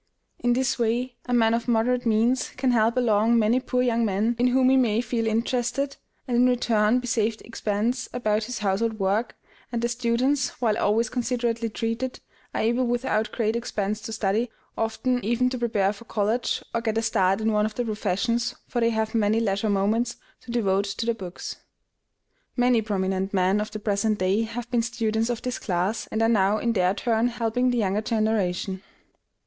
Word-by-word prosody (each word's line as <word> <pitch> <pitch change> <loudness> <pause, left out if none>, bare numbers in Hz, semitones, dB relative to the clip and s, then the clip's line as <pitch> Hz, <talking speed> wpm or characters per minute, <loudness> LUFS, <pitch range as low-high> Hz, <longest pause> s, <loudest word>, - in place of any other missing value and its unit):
In 245 0 +2
this 260 +1 0
way, 240 +2 0
a 245 - -1
man 225 -1 +4
of 230 +1 -1
moderate 245 +1 +1
means 230 +4 +2
can 255 -1 +2
help 230 +1 +2
along 230 -1 +3
many 225 +3 +3
poor 250 -1 0
young 235 -1 +1
men 215 +3 +1
in 245 - +4
whom 255 +1 +4
he - - +5
may 230 -4 +3
feel 230 -1 -1
interested, 245 +5 -1 0.3
and 245 - -1
in 245 +1 +5
return 230 -2 +2
be 250 - -3
saved 225 -2 0
expense 230 +3 -2
about 215 -3 0
his 250 +1 -5
household 215 +2 0
work; 205 +4 0 0.4
and 235 -1 -2
the - - +3
students, 245 +3 0
while 225 -4 +2
always 220 +2 +2
considerately 235 -2 -1
treated, 230 +4 -3 0.4
are - - 0
able 240 +3 +1
without 235 -2 0
great 220 -1 0
expense 215 -3 -2
to 215 - -7
study, 220 +2 0 0.3
often 245 +3 -1
even 240 +3 +1
to 255 - -3
prepare 210 -4 +1
for 210 +3 -14
college, 225 +3 -1
or 230 - 0
get 225 -1 -1
a 225 - +1
start 195 -3 +2
in 220 0 +1
one 210 0 +2
of 215 - -9
the 245 - -1
professions, 230 +3 -1
for 240 - -2
they 230 - +4
have 220 -1 -1
many 220 -1 +2
leisure 210 -1 0
moments 215 +5 +1 0.2
to - - -18
devote 200 -4 +1
to 200 +3 -4
their 235 - +1
books. 185 -5 -7 1.0
Many 245 -2 +3
prominent 195 -2 -1
men 190 +2 +2
of 215 - -4
the 215 - -6
present 210 0 0
day 190 +3 +1
have 230 +2 -6
been 240 -2 +2
students 225 -1 -1
of 240 -1 -3
this 250 -1 -3
class, 190 +3 -1
and 220 +1 -1
are - - +4
now 210 -2 +3
in 235 +1 0
their 185 -2 +2
turn 230 0 +1
helping 245 +1 0
the 245 - 0
younger 205 -1 +1
generation. 210 -4 -1
225 Hz, 190 wpm, -25 LUFS, 210-240 Hz, 1.0 s, he